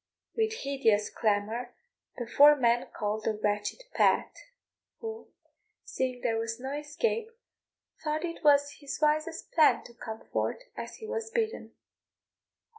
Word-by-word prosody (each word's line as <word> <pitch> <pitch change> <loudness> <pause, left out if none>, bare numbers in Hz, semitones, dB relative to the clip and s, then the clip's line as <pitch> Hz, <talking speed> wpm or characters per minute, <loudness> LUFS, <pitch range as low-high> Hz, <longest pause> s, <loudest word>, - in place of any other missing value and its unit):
With 440 -1 +1
hideous 230 -7 +2
clamour 220 +3 -1 0.4
the 240 - -3
four 290 +5 +7
men 240 -3 +2
called 215 0 -2
the 220 - +1
wretched 210 - -1
Pat, - - +3 0.6
who, 450 -1 -6 0.6
seeing 255 -1 -2
there 225 -1 0
was 225 +1 -3
no 265 +2 -5
escape, 295 +10 -1 0.7
thought 310 +2 -1
it 335 -1 -6
was 285 -1 +4
his 285 -2 -5
wisest 310 +2 0
plan 315 -2 +5
to 240 - -13
come 220 -1 -8
forth - - -2
as - - -6
he 440 - -9
was 455 0 -3
bidden. 455 -1 -2
280 Hz, 135 wpm, -29 LUFS, 230-335 Hz, 0.7 s, four